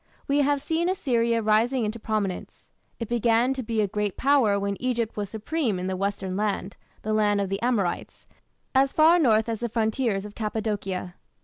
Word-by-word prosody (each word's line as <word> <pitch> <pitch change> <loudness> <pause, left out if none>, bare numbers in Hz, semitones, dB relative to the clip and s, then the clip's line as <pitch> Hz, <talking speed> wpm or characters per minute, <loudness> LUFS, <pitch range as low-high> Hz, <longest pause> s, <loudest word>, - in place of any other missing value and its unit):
We 280 +1 +2
have 285 0 +1
seen 330 +3 0
Assyria 235 - +1
rising 225 +3 +2
into 215 +2 -4
prominence. 210 -4 -3 0.3
It 230 - -4
began 240 +2 +2
to 265 - -4
be 225 -2 -1
a 205 - +1
great 205 0 -2
Power 255 -7 +3
when 200 0 -2
Egypt 235 -3 -1
was 205 -2 -3
supreme 225 - -2
in 180 - -4
the 190 0 -2
"Western 190 -1 -2
Land" 200 -1 -2 0.3
(the 215 - -1
land 210 -1 +2
of 200 -1 -1
the 195 0 -3
Amorites) 225 -8 -1 0.5
as 270 0 +3
far 325 +3 +5
north 220 -7 +3
as 225 -2 -2
the 235 - -2
frontiers 220 -2 0
of 210 - -9
Cappadocia. 205 -5 -3
220 Hz, 185 wpm, -25 LUFS, 205-250 Hz, 0.5 s, far